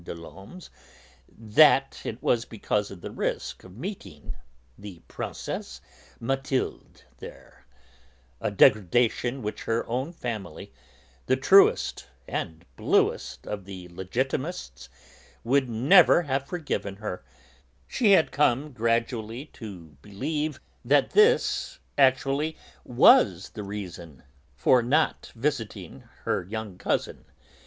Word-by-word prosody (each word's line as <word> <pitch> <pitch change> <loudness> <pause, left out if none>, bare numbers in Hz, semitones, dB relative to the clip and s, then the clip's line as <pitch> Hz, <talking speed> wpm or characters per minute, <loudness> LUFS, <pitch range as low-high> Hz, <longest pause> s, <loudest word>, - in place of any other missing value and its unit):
des 85 - -7
Laumes's, 95 - -12 0.6
that 135 +5 +3
it 115 - -6
was 115 -1 +2
because 105 -3 -2
of 95 -3 -11
the - - -7
risk - - -4
of 95 +2 -14
meeting 150 - -8 0.4
the 100 0 -10
Princesse - - -6 0.4
Mathilde 135 +2 -3 0.2
there - - -13 0.7
a - - -1
degradation 120 +4 +2
which 105 - -5
her 115 0 0
own 130 +7 -2
family, 110 - -6 0.5
the 130 - +3
truest 190 +9 +4 0.2
and 80 +1 -5
bluest - - 0
of 100 -2 -6
Legitimists, 95 - -4 0.5
would 130 +1 +2
never 140 - +5
have 135 -2 -2
forgiven 145 - -4
her, 100 -7 -6 0.6
she 210 -5 +3
had 165 - +4
come 145 0 +1
gradually 115 +1 -1
to 90 - -10
believe 150 - -3 0.2
that 140 +3 +3
this 475 +3 +3 0.2
actually 140 +3 +2 0.3
was 100 -6 +5
the 105 - -7
reason 90 -8 -8 0.3
for 130 - +4
her 120 - -6
not 155 +5 +1
visiting 120 -3 -4 0.2
her - - -1
young 105 -1 -7
cousin. - - -2
115 Hz, 110 wpm, -26 LUFS, 100-140 Hz, 0.7 s, never